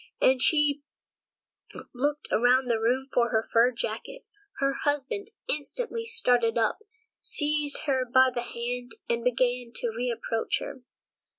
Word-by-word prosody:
And 260 -1 +4
she 295 +1 +3 1.1
looked 290 +4 -1
around 250 +3 +4
the 225 - +1
room 250 +4 +1
for 235 -1 +3
her 220 0 0
fur 235 +2 +6
jacket. 235 - -5 0.3
Her 275 0 +1
husband 290 +10 -2 0.2
instantly 460 - -3
started 245 - +2
up, 225 -2 +1 0.4
seized 295 -1 0
her 265 -3 +1
by 260 +1 +4
the 240 - -2
hand, 245 0 -4
and 235 0 -1
began 245 0 0
to 235 - -2
reproach 230 -2 -1
her. 260 - -7
250 Hz, 130 wpm, -27 LUFS, 235-290 Hz, 1.1 s, fur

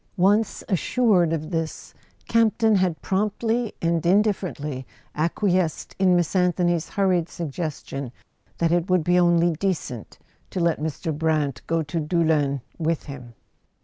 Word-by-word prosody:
Once 205 +4 +2
assured 190 -3 +2
of 155 0 -3
this, 165 -2 -4 0.3
Campton 225 -1 +3
had 185 -4 0
promptly 215 +4 0
and 165 -1 +1
indifferently 175 -8 0 0.3
acquiesced 175 +1 0
in 185 -2 +4
Miss 175 -2 +1
An¬ 180 -2 +2
thony's 175 -2 0
hurried 185 -4 +1
suggestion 145 -5 -5 0.5
that 165 -1 +1
it 175 +2 +1
would 180 -3 +3
be 180 +2 +3
only 175 -1 +4
decent 155 - -3 0.3
to - - -4
let 170 -1 +1
Mr. 160 +1 -3
Brant 150 -4 0
go 165 -1 +1
to 155 +3 -3
Doullens 150 -4 +1 0.2
with 165 0 0
him. 125 -5 -10
170 Hz, 135 wpm, -24 LUFS, 155-185 Hz, 0.5 s, in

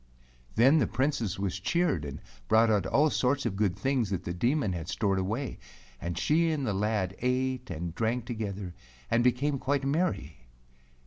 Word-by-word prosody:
Then 135 +8 +6
the 115 - +2
Princess 130 -7 -1
was 95 -1 -2
cheered 160 - +1
and 70 - -7 0.3
brought 110 +1 +5
out 105 -2 +2
all 150 +2 +3
sorts 140 +2 +1
of 95 - -1
good 100 -3 +1
things 125 +1 0
that 95 -4 -2
the 85 - -3
Demon 120 - +1
had 85 -2 -5
stored 95 0 0
away, 110 +8 -3 0.4
and 85 0 -3
she 165 - +2
and 145 -4 -1
the 105 - 0
lad 100 -2 0
ate 130 0 -1
and 85 -1 -4
drank 115 +4 -1
together 105 -6 -4 0.4
and 115 +1 +3
became 135 +3 +1
quite 140 +1 0
merry. 140 - -1
115 Hz, 175 wpm, -29 LUFS, 95-135 Hz, 0.4 s, Then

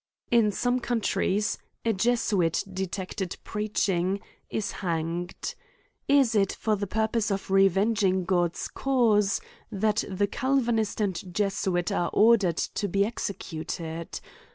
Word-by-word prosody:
In 230 -3 +4
some 245 +4 0
countries, 215 -4 0 0.3
a 225 - +3
Jesuit 200 -5 +1
detected 190 0 -4
preaching, 195 -3 0 0.3
is 215 - -2
hanged. 170 0 -3 0.5
Is 275 -5 +4
it 200 -3 +2
for 215 -1 0
the 200 0 -3
purpose 220 +2 0
of 195 -1 -3
reveling 195 0 +3
God's 175 -2 0
cause, 220 -7 +2 0.3
that 210 +1 +1
the 200 +1 +1
Calvanist 235 -3 0
and 190 -2 -2
Jesuit 190 -2 0
are 175 - 0
or 230 +3 +7
dered 180 -7 -1
to 205 - -1
be 200 +2 +2
executed 165 -6 -5
200 Hz, 120 wpm, -27 LUFS, 185-220 Hz, 0.5 s, or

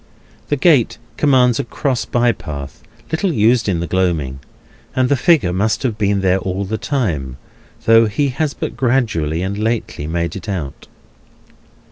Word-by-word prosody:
The 145 - +2
gate 145 -4 +3 0.2
commands 125 -5 +3
a - - 0
cross 130 0 -2
bye 120 0 +2
path, 70 -9 -8 0.3
little 175 +4 0
used 115 -3 +2
in 85 -3 0
the - - -1
gloaming; 85 -8 -1 0.6
and 130 -1 +2
the 140 - +4
figure 125 - +3
must 110 +4 0
have 120 -5 0
been 100 -1 +1
there 95 0 +2
all 95 +1 -3
the 110 +3 -3
time, 80 - -2 0.5
though 115 0 +6
he 140 +7 0
has 140 +3 -2
but - - -4
gradually 110 - 0
and 100 +2 -3
lately 110 -9 -2
made 85 0 -2
it 95 +2 -7
out. 80 -9 -5
110 Hz, 160 wpm, -18 LUFS, 90-125 Hz, 0.6 s, though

